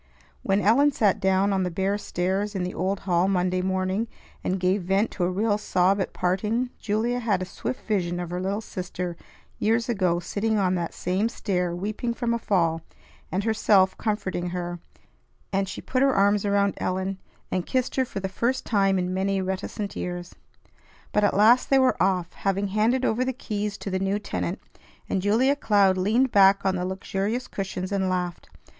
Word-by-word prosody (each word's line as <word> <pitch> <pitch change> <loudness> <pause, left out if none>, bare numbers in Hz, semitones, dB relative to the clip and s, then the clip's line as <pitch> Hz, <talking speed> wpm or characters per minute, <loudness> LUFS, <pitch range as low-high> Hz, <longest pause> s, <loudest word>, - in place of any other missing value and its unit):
When 195 +1 +1
Ellen 270 +9 +4
sat 210 -6 +2
down 190 +1 +2
on 190 - +1
the 180 - 0
bare 190 +3 0
stairs 195 +2 -2
in 185 - -1
the 180 - -3
old 190 +2 -1
hall 180 -1 +2
Monday 185 -1 +1
morning, 190 +4 -1 0.4
and 185 +1 -1
gave 185 +2 +1
vent 195 +5 +1
to 180 - -3
a 175 - +2
real 205 +3 +1
sob 195 0 +2
at - - -2
parting, 210 +7 -1
Julia 230 +3 0
had 215 -6 +1
a 185 - -3
swift 215 +7 -5
vision 175 -5 -1
of 175 -1 -5
her 180 0 -2
little 200 +3 -1
sister 180 -3 -5 0.4
years 230 +2 +1
ago 185 -6 +1
sitting 215 +4 -1
on 185 -2 +2
that 175 -2 -3
same 190 +5 0
stair 180 -6 -1
weeping 215 +6 -3
from 235 -1 -1
a 235 - -1
fall, 165 -7 +1 0.5
and 190 +2 -1
herself 205 -3 +3
comforting 185 -5 -2
her; 175 -1 -4 0.7
and 195 0 0
she - - -6
put 255 - -1
her 275 -1 +4
arms 200 +1 +3
around 200 -1 +2
Ellen, 190 +1 -2 0.3
and 185 -1 -1
kissed 255 -1 -1
her 265 - +3
for 235 - -5
the 190 - -2
first 235 +7 -1
time 195 -3 +2
in 180 0 -1
many 195 +1 0
reticent 190 +2 -4
years. 175 0 -5 0.8
But 210 - +2
at 205 - +2
last 230 +5 +5
they 270 - +5
were 260 -8 +3
off, 180 -2 +1
having 195 0 -1
handed 225 +6 +2
over 235 +3 +1
the 260 0 -1
keys 210 -4 -3
to 200 - -6
the 190 - 0
new 195 +1 0
tenant, 210 - -3 0.5
and 190 - -1
Julia 235 +8 +3
Cloud 205 -8 +3
leaned 225 +8 +2
back 195 0 +5
on 190 -1 +2
the 180 0 -2
luxurious 195 +5 -2
cushions 190 -1 -4
and 190 -2 0
laughed. 180 -2 -3
195 Hz, 190 wpm, -25 LUFS, 185-215 Hz, 0.8 s, last